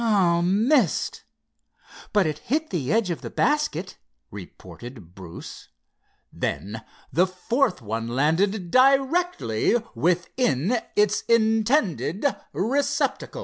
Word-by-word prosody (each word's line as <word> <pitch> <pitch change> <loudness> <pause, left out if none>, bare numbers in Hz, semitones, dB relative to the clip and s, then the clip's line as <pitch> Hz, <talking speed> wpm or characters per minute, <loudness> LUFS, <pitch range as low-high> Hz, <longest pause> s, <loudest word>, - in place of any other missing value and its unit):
"Ah—missed! 200 - +2 0.9
but 205 -3 +3
it 155 -1 -2
hit 310 - -2
the 155 -6 -2
edge 220 -5 +1
of 170 - -4
the - - -6
basket," 195 - -1 0.3
reported 115 -9 -11
Bruce. 90 -3 -10 0.7
Then 110 +3 -4 0.3
the 180 +4 +3
fourth 185 - -1
one 115 +2 -3
landed 170 - 0
directly 270 - +2 0.2
within 175 - 0 0.2
its 210 0 +2
intended 220 - +1 0.3
receptacle. 280 - -1
190 Hz, 95 wpm, -24 LUFS, 150-250 Hz, 0.9 s, but